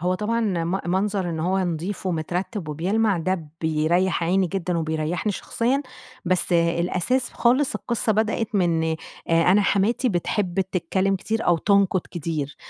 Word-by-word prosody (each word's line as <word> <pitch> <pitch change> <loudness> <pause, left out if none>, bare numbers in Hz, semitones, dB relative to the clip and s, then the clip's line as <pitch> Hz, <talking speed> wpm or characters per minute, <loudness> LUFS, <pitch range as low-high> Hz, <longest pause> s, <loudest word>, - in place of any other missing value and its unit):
هو 180 +2 +1
طبعًا 215 +4 -1
م 185 -3 0
منظر 190 0 0
إن 160 -1 -3
هو 185 +4 +1
نضيف 180 +2 -3
ومترتِّب 180 +2 -3
وبيلمَع 195 +6 +1
ده 170 -2 -2
بيريّح 165 +3 +1
عيني 185 +2 +2
جدًا 180 -1 -2
وبيريّحني 160 +5 -1
شخصيًا، 255 +8 -1 0.4
بس 185 0 +1
الأساس 175 +8 +1
خالص، 255 +4 +2
القصة 235 -2 -1
بدأت 220 +1 -1
من 170 -4 +2
آآ 160 - -1 0.6
أنا 205 +1 +4
حماتي 220 +6 +2
بتحب 185 0 -1
تتكلّم 190 +1 0
كتير 220 +4 -2
أو 175 - +4
تنقُد 200 -1 +3
كتير، 155 -4 -4
185 Hz, 140 wpm, -23 LUFS, 170-205 Hz, 0.6 s, أنا